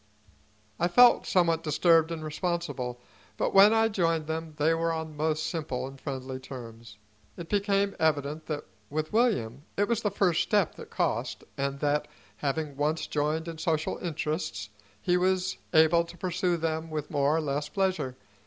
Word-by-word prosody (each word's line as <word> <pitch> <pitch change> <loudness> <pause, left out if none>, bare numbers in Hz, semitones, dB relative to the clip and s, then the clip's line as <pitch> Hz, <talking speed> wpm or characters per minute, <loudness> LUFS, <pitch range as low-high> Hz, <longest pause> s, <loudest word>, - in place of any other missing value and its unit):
I 175 - +3
felt 245 +7 +6
somewhat 170 -3 +3
disturbed 165 +1 +3
and 160 -1 -4
responsible, 155 -7 -3 0.4
but - - 0
when 195 +2 +8
I 225 0 +4
joined 165 -7 0
them 160 0 -4
they 155 +2 +3
were 165 0 0
on 160 -1 -4
most 155 +1 0
simple 150 -8 -3
and 135 0 -10
friendly 130 -2 -5
terms. 115 -4 -10 0.4
It 170 -1 -8
became 200 -1 +1
evident 150 0 0
that, 150 -2 -3 0.3
with 155 +4 -3
William, 170 - +1 0.2
it 205 +1 +2
was 235 -1 0
the 205 - +1
first 185 -4 +2
step 205 -5 +2
that - - -11
cost, - - -1
and 140 0 -2
that, 150 0 +1 0.3
having 145 0 -2
once 150 +2 0
joined 155 +2 -1
in 165 -1 -6
social 160 -2 -1
interests, 150 - -3 0.3
he 180 - +3
was 185 0 0
able 160 +2 +5
to 170 +1 -12
pursue 180 0 0
them 160 0 -2
with 150 -2 -4
more 140 +2 +2
or - - +2
less 145 0 -2
pleasure. 185 -10 -1
160 Hz, 165 wpm, -28 LUFS, 145-175 Hz, 0.4 s, when